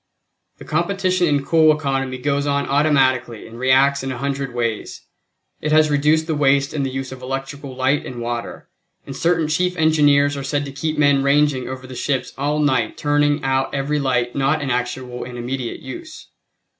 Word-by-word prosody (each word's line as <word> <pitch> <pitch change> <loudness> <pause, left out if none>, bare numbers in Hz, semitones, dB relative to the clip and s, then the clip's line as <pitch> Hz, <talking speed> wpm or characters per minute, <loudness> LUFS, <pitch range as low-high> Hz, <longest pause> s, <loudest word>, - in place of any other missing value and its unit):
The - - -12
competition 185 +2 0
in 145 -2 +1
coal 160 -1 +5
economy 135 -3 -2
goes 140 +2 -1
on 140 0 0
automatically 130 -5 +1
and 115 +1 -11
reacts 135 +2 +3
in 135 0 -4
a 125 - -5
hundred 135 0 -3
ways. 115 -2 -3 0.6
It 155 - -2
has 155 0 +4
reduced 150 +2 +2
the 160 - -1
waste 140 -1 +2
in 150 - -1
the 135 - -1
use 135 0 -5
of 130 -1 -9
electric 135 +2 -5
light 130 +1 0
and 125 -2 -7
water, 120 0 -5 0.4
and 135 - -7
certain 165 +1 +1
chief 180 +4 0
engineers 145 -2 +3
are 140 - -5
said 145 +1 -1
to 140 - -7
keep 155 +3 -3
men 145 -2 +4
ranging 140 -2 +2
over 130 0 -7
the 130 - -9
ships 130 +1 -2
all 145 +2 -1
night 130 -7 +1
turning 145 0 +1
out 135 +1 0
every 145 +2 -1
light 125 -3 0
not 140 +3 +1
in 140 -3 -3
actual 125 0 -3
and 125 0 -8
immediate 125 0 -4
use. 315 -2 -9
140 Hz, 185 wpm, -20 LUFS, 130-150 Hz, 0.6 s, coal